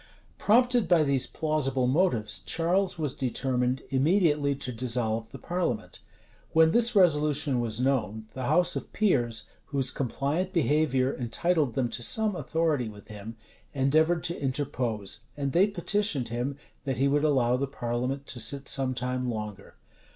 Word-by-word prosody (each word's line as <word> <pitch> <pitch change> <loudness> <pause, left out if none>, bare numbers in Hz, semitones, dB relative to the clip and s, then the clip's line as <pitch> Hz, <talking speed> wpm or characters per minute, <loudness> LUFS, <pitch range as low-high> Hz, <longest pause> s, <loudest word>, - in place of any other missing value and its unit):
Prompted 245 +2 +3
by 170 -3 +4
these 140 -3 +1
plausible 140 -5 -1
motives, 130 - +1
Charles 180 +3 +1
was 150 -5 -1
determined 130 0 -1
immediately 145 0 +2
to 130 - -5
dissolve 115 -2 -1
the - - -8
parliament. 170 -12 -3 0.5
When 160 0 +5
this 235 +3 +3
resolution 150 -7 +3
was 115 -2 -2
known, 110 -5 0
the 130 -1 -4
house 175 +8 +3
of - - -5
peers, 120 - +1 0.2
whose 135 -2 -1
compliant 145 +9 -2
behavior 145 - +2
entitled 140 +2 0
them 130 -3 +1
to 120 - -4
some 215 - +1
authority 160 -9 0
with 105 -1 -14
him, 105 +2 -8 0.4
endeavored 155 +5 +2
to 170 - -2
interpose;[*] 130 -7 -2 0.2
and 140 -1 -1
they 185 +7 +4
petitioned 200 - -1
him, 125 +4 -3 0.3
that 135 -3 -2
he 135 +2 +2
would 145 +1 +2
allow 130 -5 +3
the 140 +2 -1
parliament 125 +2 -3
to 125 - -7
sit 140 +4 -1
some 130 -2 +1
time 125 0 -2
longer. 105 -3 -6
135 Hz, 150 wpm, -28 LUFS, 125-160 Hz, 0.5 s, When